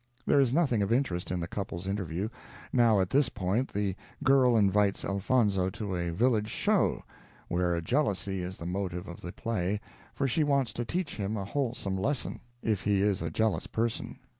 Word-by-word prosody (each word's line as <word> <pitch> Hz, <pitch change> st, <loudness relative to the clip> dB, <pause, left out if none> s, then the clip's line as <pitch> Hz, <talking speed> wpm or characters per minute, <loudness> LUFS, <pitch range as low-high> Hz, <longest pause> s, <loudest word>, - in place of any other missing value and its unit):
There 145 Hz, -, +4 dB
is 135 Hz, -4 st, +4 dB
nothing 135 Hz, -7 st, +2 dB
of 100 Hz, -, 0 dB
interest 115 Hz, -9 st, 0 dB
in 90 Hz, -, -1 dB
the 85 Hz, -, -3 dB
couple's 95 Hz, -2 st, -5 dB
interview. 95 Hz, 0 st, -2 dB, 0.4 s
Now 115 Hz, -4 st, +5 dB
at 95 Hz, -, -1 dB
this 135 Hz, -1 st, +4 dB
point 100 Hz, +8 st, -1 dB
the 100 Hz, -2 st, -1 dB, 0.3 s
girl 130 Hz, -3 st, +5 dB
invites 100 Hz, -1 st, +3 dB
Elfonzo 100 Hz, -2 st, +2 dB
to 100 Hz, 0 st, -4 dB
a 85 Hz, -1 st, -1 dB
village 110 Hz, +4 st, +2 dB
show, -, -, +1 dB, 0.5 s
where 85 Hz, -1 st, +1 dB
jealousy 100 Hz, -, 0 dB
is 90 Hz, +1 st, -5 dB
the 85 Hz, -, -7 dB
motive 90 Hz, 0 st, -3 dB
of 85 Hz, -, -9 dB
the 85 Hz, -, -6 dB
play, 105 Hz, -3 st, -1 dB, 0.4 s
for 135 Hz, +2 st, +1 dB
she 150 Hz, +5 st, +2 dB
wants 140 Hz, -6 st, +1 dB
to 120 Hz, -, -3 dB
teach 175 Hz, +4 st, -2 dB
him 105 Hz, +1 st, -2 dB
a 100 Hz, -, -3 dB
wholesome 115 Hz, -5 st, -2 dB
lesson, 135 Hz, +7 st, -1 dB, 0.2 s
if 105 Hz, -4 st, +1 dB
he 100 Hz, -1 st, +2 dB
is 100 Hz, -1 st, +1 dB
a -, -, -2 dB
jealous 110 Hz, -2 st, 0 dB
person. 115 Hz, 0 st, -2 dB
105 Hz, 185 wpm, -29 LUFS, 95-120 Hz, 0.5 s, Now